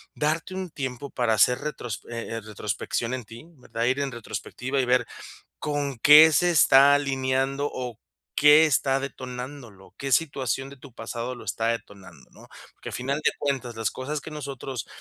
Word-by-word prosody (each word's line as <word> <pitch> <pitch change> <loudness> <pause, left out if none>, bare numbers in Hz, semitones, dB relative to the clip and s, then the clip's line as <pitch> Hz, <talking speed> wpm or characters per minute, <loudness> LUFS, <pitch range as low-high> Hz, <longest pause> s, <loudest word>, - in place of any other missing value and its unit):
Darte 160 +4 -1
un 190 -1 -4
tiempo 130 0 -5
para 120 -3 +1
hacer 125 +4 +4
retros 135 -7 -5
eh, 115 -1 -5
eh, - - -5
retrospección 110 +3 -3
en 130 -1 -3
ti, 115 +6 -12
¿verdad? 115 -2 -4
Ir 130 +3 +1
en 140 -1 -2
retrospectiva 130 +3 -4
y - - -1
ver 125 +1 +2 0.5
con 145 -3 -3
qué 150 +5 +8
se 175 +4 +3
está 140 -3 +6
alineando, 135 0 0
o 125 -3 -5 0.4
qué 150 +1 +7
está 135 -1 +1
detonándolo, 125 -5 -8
qué 135 -1 -3
situación 135 -3 0
de 140 - -13
tu 130 -2 -14
pasado 120 +1 -5
lo 120 - -11
está 110 +2 -2
detonando, 95 -8 -16
¿no? - - -16 0.3
Porque, - - -10
al - - -8
final 135 +4 -2
de - - +4
cuentas, 130 -5 -2
las 110 -2 -1
cosas 145 +3 -4
que - - -8
a - - -8
nosotros 135 -4 -6
130 Hz, 180 wpm, -25 LUFS, 120-145 Hz, 0.5 s, qué